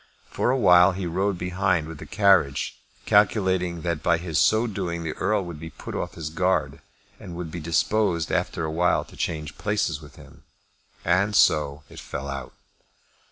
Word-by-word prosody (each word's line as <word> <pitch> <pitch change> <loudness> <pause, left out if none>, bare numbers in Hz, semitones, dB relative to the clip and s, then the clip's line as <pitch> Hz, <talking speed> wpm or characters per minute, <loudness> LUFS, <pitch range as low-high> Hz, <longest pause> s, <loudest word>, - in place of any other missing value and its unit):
For - - 0
awhile 95 -7 +5
he 95 0 -4
rode 95 +3 -1
behind 90 -2 0
with 80 -2 -9
the - - -9
carriage, 95 -10 +2 0.3
calculating 95 -4 +2
that 85 -3 -2
by 85 +2 +2
his 80 -3 -2
so 110 +2 +4
doing 90 -6 -3
the 80 - -3
Earl 100 -1 0
would 85 -3 -8
be 80 +1 -7
put - - -9
off - - -4
his 80 -2 -5
guard, 90 +3 0 0.4
and 85 - -9
would 85 -2 -6
be 85 - -5
disposed 85 +1 0
after 85 - -1
awhile 80 +3 +1
to - - -16
change 75 -2 -4
places 100 -8 -1
with 75 -2 -14
him. - - -16 0.6
And 95 +4 +2
so 75 -4 +3
it - - -11
fell 65 +2 -6
out. 70 -1 -6
85 Hz, 170 wpm, -25 LUFS, 80-95 Hz, 0.6 s, awhile